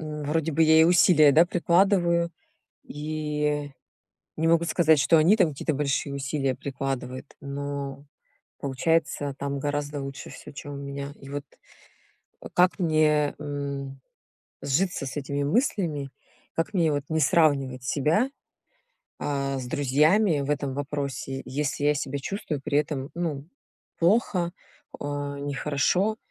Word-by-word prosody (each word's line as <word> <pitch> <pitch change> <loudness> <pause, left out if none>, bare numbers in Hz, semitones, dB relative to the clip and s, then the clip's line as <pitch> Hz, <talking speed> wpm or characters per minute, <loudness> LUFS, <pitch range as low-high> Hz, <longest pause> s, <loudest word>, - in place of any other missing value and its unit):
М, 150 -1 -5
вроде 160 +2 0
бы 160 +3 +3
я 160 0 +6
и 160 - +7
усилия, 170 -3 +6
да, 165 +4 +6
прикладываю 175 -1 +2 0.5
и 150 -1 -2 0.7
не 160 - +1
могу 165 0 +4
сказать, 160 -2 +4
что 160 +5 +5
они 170 +7 +5
там 180 -5 +4
какие-то 150 +1 -2
большие 140 0 -1
усилия 135 -1 -1
прикладывают, 135 0 -5
но 140 0 -5 0.5
получается 145 0 0
там 140 0 -2
гораздо 145 0 -2
лучше 135 0 -7
всё, - - -11
чем 145 0 -8
у - - -6
меня. 140 0 -6
И 135 - -11
вот 145 +1 -5 1.1
как 180 +3 +4
мне, 155 -4 +2
м, 140 -2 -5 0.6
сжиться 150 0 0
с 135 - -6
этими 140 0 -2
мыслями, 160 - 0 0.4
как 165 +6 -2
мне 165 -4 +3
вот 145 -1 -1
не 160 0 +1
сравнивать 135 -4 +2
себя, 155 - +1 0.9
а, 140 -2 -2
с 125 - -5
друзьями 150 - +3
в 140 - -4
этом 140 -2 -1
вопросе, 140 -2 -4
если 145 +1 -2
я 150 - +4
себя 140 0 -3
чувствую 150 -2 -4
при 140 - 0
этом, 145 -2 -3
ну, 155 -5 -3 0.5
плохо, 175 -1 +2 0.5
а, 145 0 -4
нехорошо. 145 +9 0
145 Hz, 135 wpm, -26 LUFS, 140-160 Hz, 1.1 s, и